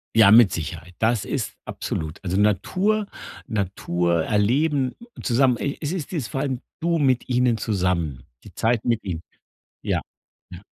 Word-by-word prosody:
Ja, 110 -3 +7
mit 115 -3 +8
Sicherheit. 85 +2 -5
Das 115 -1 +2
ist - - -3
absolut 80 +4 -5
Also, 95 +1 -1
Natur, 185 - +2 0.4
Natur 90 -5 0
erleben 130 +6 +1 0.3
zusammen 125 -1 +3
e 140 - -2
es 150 +1 -2
ist 180 -1 -4
dies 145 -9 -2
vor 135 - -3
allem, 135 -3 -2 0.2
du 170 0 +1
mit 130 -3 +2
ihnen 125 -2 +2
zusammen, 90 - -1 0.2
die - - -12
Zeit 115 -1 +1
mit 115 -2 +1
ihnen. 85 -4 -4 0.6
Ja. - - 0 0.5
Ja. 90 0 -9
115 Hz, 150 wpm, -23 LUFS, 90-135 Hz, 0.6 s, mit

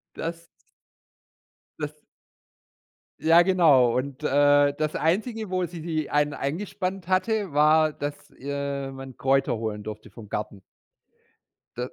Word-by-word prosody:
Das 165 0 -5 1.3
das 150 0 -4 1.2
Ja 165 +2 +6
genau, 150 -10 +4
und, 135 +1 -4
äh, 145 0 +4
das 155 +1 -2
Einzige, 215 +6 -1
wo 185 -1 0
sie 170 -1 -8
die 160 -2 -2
einen 145 0 +2
eingespannt 185 +4 -4
hatte, 195 -2 0
war, 155 +1 +4
dass, 145 0 -4 0.2
äh, 140 0 -4
man 135 -1 -9
Kräuter 135 -2 +1
holen 110 -2 -4
durfte 110 0 -8
vom 105 0 -12
Garten. 105 -1 -5 1.2
D - - -9
145 Hz, 120 wpm, -25 LUFS, 135-170 Hz, 1.3 s, Ja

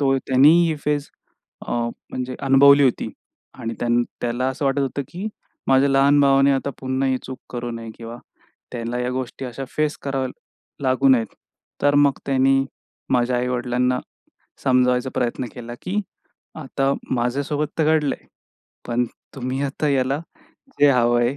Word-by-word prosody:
तो 135 -1 +3
त्यांनी 135 +3 +6 0.2
ही 155 - -1
फेज 145 -1 -1 0.6
अ, - - -3 0.4
म्हणजे 130 0 -4
अनुभवली 140 +1 +6
होती. 130 - +1 0.5
आणि 115 0 -5
त्यान 120 0 +2 0.2
त्याला 120 +1 -1
असं 130 +2 -3
वाटत 135 +1 +1
होतं, 140 +1 -1
की 190 +5 -5 0.4
माझ्या 135 +1 +5
लहान 140 +1 +4
भावाने 135 0 +5
आता 135 +1 -1
पुन्हा 130 +1 0
ही 130 - +2
चूक 130 0 -7
करू 120 -1 -4
नये 115 -1 -7
किंवा 115 0 -8 0.6
त्यांना 120 0 -3
या 125 0 -1
गोष्टी 130 +1 -4
अशा 130 +2 -5
फेस 155 0 +1
कराव्या 135 -2 -2 0.5
लागू 130 +1 +3
नयेत. 120 -4 +4 0.6
तर 145 0 +4
मग 145 -2 +4
त्यांनी 135 0 +3 0.5
माझ्या 125 0 +2
आई-वडिलांना 125 0 0 0.7
समजावायचा 125 -1 +3
प्रयत्न 125 0 -1
केला, 120 -1 -7
की 200 +3 -1 0.5
आता 135 -2 -1 0.2
माझ्यासोबत 140 +5 -1
तर 160 - +3
घडलंय. 145 -3 -3 0.6
पण 120 +1 +1 0.3
तुम्ही 130 +1 -3
आता 140 +2 -1
याला 135 0 +1 0.6
जे 145 - +7
हवं 120 -2 +3
आहे, 120 +4 +1
130 Hz, 150 wpm, -22 LUFS, 125-140 Hz, 0.7 s, जे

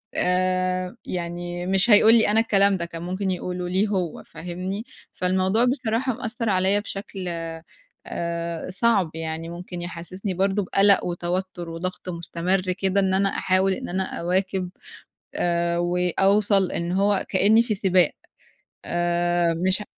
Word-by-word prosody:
آآ، 185 +1 0
يعني 175 0 -4
مش 195 +4 +2
هيقول 220 +1 +7
لي 225 - +4
أنا 220 - +4
الكلام 200 -3 +3
ده، 170 - -3
كان 170 0 -8
ممكن 185 +2 -2
يقوله 180 0 -3
ليه 190 +4 +2
هو 185 -6 -2
فاهمني؟ 185 +5 -5 0.3
فالموضوع 190 +5 +1
بصراحة 250 0 0
مأثّر 230 -1 -3
عليَّ 190 +2 +2
بشكل 195 -2 -6 0.8
آآ 170 0 -4
صعب، 195 -2 +2
يعني 160 0 -4
ممكن 175 0 -7
يحسّسني 180 +3 -5
برضه 195 +3 +1
بقَلَق 195 +1 +4
وتوتُّر 175 0 -3
وضغط 180 +2 -5
مستمر 180 +2 -1
كده 195 +1 0
إن 190 -1 +2
أنا 195 +1 +2
أحاول 190 +1 +1
إن - - -6
أنا 190 +2 -1 0.2
أواكب، 185 +1 0 0.7
آآ 170 0 0
وأوصل 190 +3 +2
إن 170 +1 -2
هو 200 +1 +1
كإني 210 +4 +4
في 225 -3 -1
سباق، 185 -4 +3 0.7
آآ 175 0 +1
مش 190 +4 +1
ه - - -8
185 Hz, 140 wpm, -24 LUFS, 175-195 Hz, 0.8 s, هيقول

